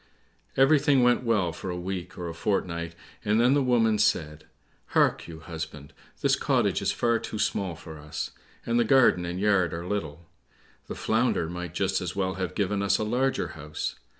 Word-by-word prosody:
Everything 140 -1 +5
went 125 0 +4
well 105 -8 +1
for 95 - -6
a 90 - -3
week 90 0 -5
or 90 -1 -4
a 85 - -5
fortnight, 85 -3 -2 0.3
and 105 +2 +2
then 125 +3 +5
the 145 - +3
woman 115 -4 +3
said, 75 -1 0 0.5
"Hark - - +3
you, 80 -1 -9
husband, 80 -3 -7 0.3
this - - +3
cottage - - +1
is - - +1
far 115 -1 +1
too 110 - -6
small 95 -4 -1
for 80 -1 -10
us, 75 0 -5 0.3
and 120 0 +1
the - - +5
garden 115 -7 +4
and 90 +1 -4
yard 95 -5 +2
are 85 +1 -5
little; 85 -5 -4 0.6
the - - -5
Flounder 110 -7 +1
might 90 0 -6
just 95 +1 0
as 90 -3 -4
well 95 -1 0
have 95 -2 -4
given 100 -1 0
us 100 0 +2
a - - -1
larger 125 +5 0
house. 75 -1 -5
95 Hz, 185 wpm, -27 LUFS, 85-115 Hz, 0.6 s, Everything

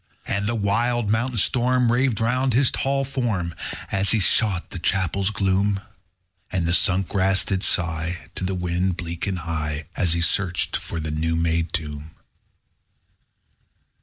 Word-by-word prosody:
11. - - -2
And 100 +1 -1
the 120 - -1
wild 110 +2 +1
midnight 120 +2 0
storm 125 +3 +3
Raved 125 -2 +2
around 125 +2 +1
his 130 0 +4
tall 135 0 0
form, 115 -11 -2
_60 - - -6
As 95 0 +2
he 115 - +3
sought 100 -2 +2
the 90 - -5
chapel's 95 +2 0
gloom: 100 0 +1 0.7
And 90 -3 0
the 85 - +1
sunk 95 0 +2
grass 95 0 +2
did 95 -2 -1
sigh 85 -1 -1
To - - -4
the 95 +1 -1
wind, 90 0 -1
bleak 85 +1 -4
and 95 -2 -1
high, 75 -2 -3
As 85 -3 +1
he 85 - 0
searched 90 0 +1
for 85 - -4
the 75 -1 -3
new 80 +2 -1
made 80 0 0
tomb. 75 -1 -5
95 Hz, 165 wpm, -23 LUFS, 85-110 Hz, 0.7 s, his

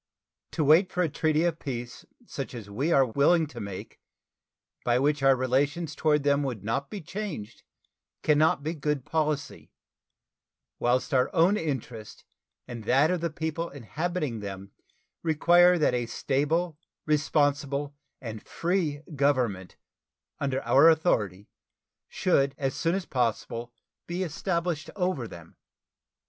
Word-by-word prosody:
To 160 - 0
wait 160 +6 +5
for 180 - +1
a 165 - 0
treaty 155 +1 +1
of 170 -2 0
peace 120 -3 -6 0.2
such 135 - -6
as 105 -4 -8
we 140 +11 -1
are 135 -4 +5
willing 145 +7 +3
to 150 - -10
make, 100 -2 -7 0.8
by 120 0 +2
which 145 +2 +1
our 135 0 +5
relations 140 +6 0
toward 150 -2 +1
them 140 0 +3
would 125 -8 -3
not 135 +6 -2
be 205 - -6
changed, 165 - -6 0.6
can 150 -1 +3
not 155 -2 +3
be 160 +2 -2
good 150 -3 -2
policy; 155 -2 -2 1.1
whilst 125 +4 +1
our 125 -1 +3
own 175 +4 +5
interest 125 - -5 0.4
and 120 -2 -7
that 140 +8 +4
of 180 -2 -1
the 170 - 0
people 160 +2 -3
inhabiting 150 0 -3
them 100 -1 -7 0.5
require 175 +2 +5
that 150 -6 +2
a 120 -1 -1
stable, 150 +6 -1 0.3
responsible, 145 -1 +1 0.2
and 110 -3 -7
free 165 -5 -1
government 125 -10 0 0.6
under 135 -1 -1
our 145 +5 +6
authority 105 - +1 0.6
should 140 -6 +1
as 135 -2 -1
soon 165 +1 0
as 195 -2 -3
possible 120 -1 -2 0.4
be 175 +2 -2
established 170 -1 -2
over 180 - -1
them. 85 -5 -13
145 Hz, 135 wpm, -27 LUFS, 125-165 Hz, 1.1 s, our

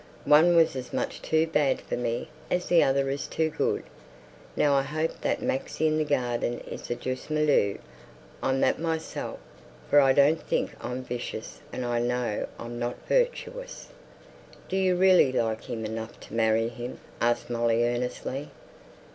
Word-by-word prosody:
One 160 +4 +6
was 165 -4 +4
as 130 -1 -6
much - - -2
too 160 0 +2
bad 150 -4 +1
for - - -4
me 120 -1 -2 0.2
as 180 0 0
the 175 -1 +6
other 135 0 +2
is 140 -1 -3
too 160 -1 0
good. - - 0 0.7
Now 145 - +3
I 135 - +4
hope 155 +3 -3
that - - -1
man 135 - +1 0.2
in 155 0 +2
the - - +2
garden 120 -4 0
is - - -8
the 120 - -1
juste 130 +3 -5
milieu, 150 -10 +2 0.6
I'm 135 0 +1
that - - +2
myself, 160 -1 -3 0.5
for 145 - +8
I 135 -1 +6
don't 145 +4 +4
think - - -1
I'm 125 +1 -4
vicious, 120 - -6
and 125 - -4
I 120 -1 0
know 120 -2 -1
I'm 120 0 -6
not 120 0 -2
virtuous." - - -1 0.8
"Do 190 - -2
you 190 -1 +3
really 185 -6 +5
like 115 -3 -1
him 110 -2 -4
enough 110 +1 -6
to - - -12
marry 115 0 +2
him?" 120 +1 -7 0.2
asked 120 +1 +1
Molly 115 0 +2
earnestly. 125 +3 -3
130 Hz, 165 wpm, -27 LUFS, 120-155 Hz, 0.8 s, for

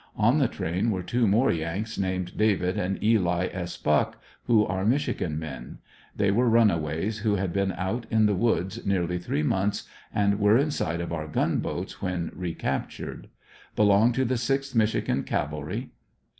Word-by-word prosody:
On 115 +7 +3
the 135 - +3
train 95 +2 -2
were 95 -4 -1
two 120 +5 +1
more 115 +7 +3
YanRs 85 +7 -3
named 95 -1 -2
David 100 -3 +1
and 95 -2 -1
Eli 90 -5 +2
S. 90 -2 -5
Buck, 75 0 +1 0.3
who 110 -3 +4
are 95 +1 -2
Michigan 105 - 0
men. 65 -6 -7 0.4
They 100 -1 +2
were 120 +4 +3
runaways 100 -2 +2
who 105 -1 +1
had 95 -3 -2
been 100 -1 +1
out 110 +6 -3
in 110 -1 +3
the 105 - +3
woods 105 0 0
nearly 90 -2 0
three 75 -3 -2
months 95 +6 0 0.2
and 100 0 +1
were 105 +2 +5
in 145 +3 +1
sight 85 - -2
of 85 - -4
our 80 -2 -3
gunboats 75 - -2
when 90 -3 -2
recaptured. 90 -2 -4 0.5
Belong 105 +3 +5
to 130 +2 +1
the 125 0 0
6th 135 +2 -1
Michigan 110 -2 +1
Cavalry. 75 0 -3
100 Hz, 165 wpm, -26 LUFS, 90-110 Hz, 0.5 s, were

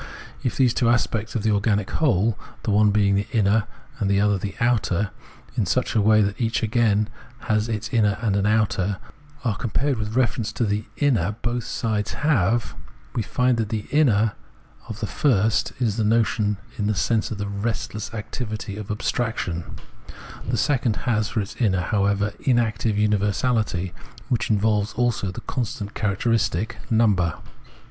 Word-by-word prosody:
If 125 - -2
the 130 - +5
two 115 0 +1
aspects 115 -2 0
of 110 - -1
the 110 - +2
organic 100 -1 +1
whole 115 - +2 0.3
the 110 - 0
one 105 +1 +5
being 100 -1 +3
the 100 +1 0
inner, 110 -2 +3 0.3
while 100 - 0
the 100 0 +3
other 105 0 +3
is 100 - 0
the 100 0 -5
outer, 105 -5 +1 0.4
in - - 0
such - - 0
a 110 - +3
way 110 +1 +5
that 100 +4 -2
each 115 0 0
again 110 -2 +2 0.3
has 110 +1 0
in 115 - 0
it 110 - -6
an - - +2
inner 105 -2 +2
and 105 -4 +2
an 100 +1 +2
outer 100 -3 +1 0.2
— 145 -1 -24
are 110 -5 +1
compared 125 +3 -1
with 110 +1 -3
reference 115 -3 +1
to 120 - -1
the 105 0 -1
inner 110 - +2
both 120 0 -1
sides 110 -4 -2
have, 115 - +1 0.4
we 115 - 0
find 125 +2 +1
that 110 -2 -1
the 110 -2 -3
inner 115 -8 +3 0.6
of 110 0 -7
the - - 0
first 110 -3 +2
is 115 -4 0
the 110 - +1
notion, 105 -1 +2 0.2
in 105 - 0
the 105 - +1
sense 110 +2 +1
of 110 - -4
the 100 - -3
restless 105 +1 -3
activity 110 -2 -5
of 105 -1 -7
abstraction; 105 -5 -2 0.8
the - - +1
second 130 -6 +1
has 110 -4 +1
for 110 - 0
its 100 - -7
inner, 95 -7 +2
however, 100 +1 +1
inactive 115 -4 +1
universahty, 105 -2 +1 0.4
which 115 -3 0
involves 105 0 +1
also 120 -5 0
the 90 - -6
constant 105 -4 -4
characteristic 110 0 0
— - - -20
number. 100 -8 +3
110 Hz, 175 wpm, -23 LUFS, 100-115 Hz, 0.8 s, the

